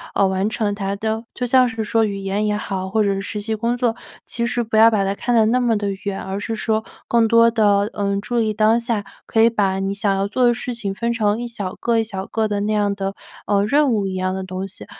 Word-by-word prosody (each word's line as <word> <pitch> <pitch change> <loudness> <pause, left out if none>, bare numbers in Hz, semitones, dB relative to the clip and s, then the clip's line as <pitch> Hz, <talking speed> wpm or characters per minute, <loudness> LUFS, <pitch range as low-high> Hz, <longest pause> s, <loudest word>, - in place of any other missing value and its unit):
呃， 195 - +4
完 190 +2 0
成 215 -2 -1
它 200 -1 -3
的。 220 +2 -3
就 250 - -3
像 255 +1 +4
是 225 -2 -3
说 225 +1 +2
语 205 -2 -3
言 195 +2 -1
也 210 - +1
好， 195 -3 -3
或 215 +2 +2
者 200 -1 +1
是 195 - -3
实 210 +1 -4
习 220 +2 -3
工 230 +3 -1
作， 240 -2 0 0.3
其 235 - -2
实 240 0 0
不 220 -1 -1
要 225 +1 +8
把 215 -3 +1
它 195 0 0
看 240 +4 -1
得 220 -2 +5
那 245 +3 +2
么 235 -3 +2
地 200 -1 -2
远， 200 -1 -3
而 190 +1 -4
是 225 +2 -3
说， 220 0 -1 0.2
更 230 -1 +4
多 230 +1 +5
地， 205 -2 +3
嗯， 200 -1 -1
注 240 +3 -1
意 220 -2 +1
当 215 +2 +3
下， 230 -3 -2 0.2
可 225 - +1
以 230 - +6
把 195 -4 0
你 195 0 -1
想 200 0 0
要 195 0 0
做 250 +4 +2
的 240 - +5
事 245 +1 -4
情 205 -4 -4
分 235 +3 -1
成 215 -1 0
一 - - -3
小 205 -6 -5
个 235 -1 0
一 - - +2
小 195 -3 -5
个 220 +1 -1
的 205 -1 -2
那 210 +1 -1
样 205 -1 +1
的， 195 0 -3 0.3
呃， 200 -1 +2
任 280 +4 +3
务 205 -4 0
一 190 - -4
样 185 0 -1
的 190 0 -4
东 185 +1 -5
西。 195 - -9
215 Hz, 290 characters per minute, -20 LUFS, 200-230 Hz, 0.3 s, 要